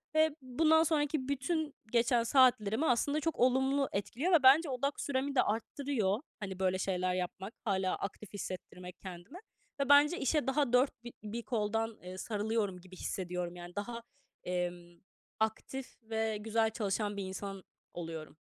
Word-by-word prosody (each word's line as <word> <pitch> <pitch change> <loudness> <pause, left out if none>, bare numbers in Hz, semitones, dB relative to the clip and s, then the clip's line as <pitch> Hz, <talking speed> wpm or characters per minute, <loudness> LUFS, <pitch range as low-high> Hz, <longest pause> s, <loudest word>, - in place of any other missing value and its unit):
ve 315 -1 +4
bundan 315 +5 +4
sonraki 295 -3 0
bütün 290 +2 -1 0.2
geçen 235 0 +3
saatlerimi 250 0 +4
aslında 285 +4 +2
çok 325 0 -2
olumlu 265 +2 +3
etkiliyor 250 - -1
ve 310 -5 +6
bence 285 +5 +7
odak 275 +2 -1
süremi 275 0 -1
de - - +6
arttırıyor 225 -1 -1 0.2
hani 190 -3 -5
böyle 185 0 +2
şeyler 185 -1 0
yapmak, 185 +3 -4
hâlâ 190 -4 +1
aktif 195 +1 -7
hissettirmek 180 -2 -7
kendime. 185 - -9 0.4
Ve 275 - 0
bence 290 +5 +7
işe 290 +1 +1
daha 270 -2 +1
4 250 -2 +3
bi 240 - -8
bir 220 +3 -4
koldan, 225 -1 -1
eee, 185 +1 -7
sarılıyorum 210 -3 -1
gibi 185 0 -13
hissediyorum. 180 -1 -3
Yani 175 0 -10
daha, 235 +3 -4 0.4
emm, 175 -1 -3 0.4
aktif 220 +4 -2
ve 220 -1 -1
güzel 220 +1 +1
çalışan 205 -1 -2
bir 200 - -2
insan 195 0 -6 0.3
oluyorum. 165 -3 -6
225 Hz, 150 wpm, -33 LUFS, 190-270 Hz, 0.4 s, bence